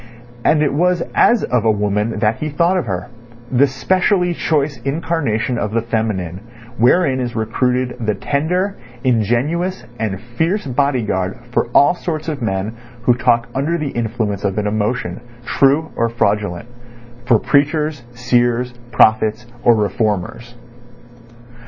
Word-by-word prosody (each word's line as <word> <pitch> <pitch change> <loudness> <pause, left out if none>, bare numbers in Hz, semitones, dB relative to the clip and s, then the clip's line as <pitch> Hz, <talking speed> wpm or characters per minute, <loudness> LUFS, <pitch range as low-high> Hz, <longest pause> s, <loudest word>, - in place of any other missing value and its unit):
And 155 -1 +3
it 145 - +1
was 175 +3 +2
as 235 -1 +4
of 125 -3 +1
a 115 - +3
woman 105 +1 0
that 110 0 +1
he 155 - -3
thought 170 +5 +2
of 180 -10 -1
her—the 120 +7 -2
specially 180 +6 +1
choice 150 -3 0
incarnation 135 -6 -1
of 105 +1 -2
the 115 - +1
feminine, 105 -7 -2 0.4
wherein 130 +2 +3
is 120 -2 -3
recruited 125 +3 0
the 105 -1 0
tender, 180 +7 -1 0.3
ingenuous, 130 - 0
and 105 -4 -2
fierce 160 - -2
bodyguard 120 -9 0
for - - +1
all 145 +4 +6
sorts 165 -3 -4
of 150 -4 -3
men 105 0 -2 0.3
who 125 - +5
talk 120 -1 +2
under 145 +6 0
the 150 -3 -3
influence 110 -4 -2
of 100 0 -1
an 105 - 0
emotion, 110 +3 -2 0.2
true 140 +6 +2
or 115 0 +1
fraudulent; 105 -3 -1 0.6
for 120 -3 +5
preachers, 145 +1 +1
seers, 120 0 +1 0.2
prophets, 110 +1 +3 0.2
or 120 -1 +5
reformers. 105 +2 -2
120 Hz, 135 wpm, -18 LUFS, 110-145 Hz, 0.6 s, all